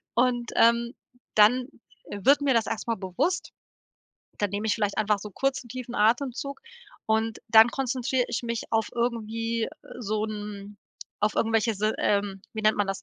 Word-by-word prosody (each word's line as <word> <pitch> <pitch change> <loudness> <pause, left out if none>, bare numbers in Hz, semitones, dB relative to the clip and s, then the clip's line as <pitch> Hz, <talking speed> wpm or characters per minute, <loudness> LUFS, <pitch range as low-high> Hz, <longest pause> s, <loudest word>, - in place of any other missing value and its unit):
und, 240 -1 +1
ähm, 235 +1 +4 0.4
dann 245 +4 +5 0.5
wird 265 +9 +3
mir 280 -2 +2
das 230 -2 +2
erst 225 - -4
mal 230 - +1
bewusst. 190 - -2 0.9
Dann 205 -2 0
nehme 205 +2 -2
ich 215 - +2
vielleicht 205 -3 -1
einfach 210 -1 +2
so 210 - -8
kurzen, 270 +3 -2
tiefen 250 0 -7
Atemzug 255 - 0 0.5
und 220 0 0
dann 220 +1 +8
konzentrier 255 -1 -1
ich - - -2
mich 235 -1 -3
auf 225 -1 +1
irgendwie, 230 -1 -1
äh, - - -4 0.3
so 215 -1 -1
'n 210 -1 -7 0.4
auf 210 0 +1
irgendwelche 225 0 +1
Si 210 +2 -1
ähm, 200 -1 0
wie 220 -1 -5
nennt 215 0 +3
man 205 -1 +1
das, 195 0 -4
225 Hz, 165 wpm, -26 LUFS, 210-245 Hz, 0.9 s, dann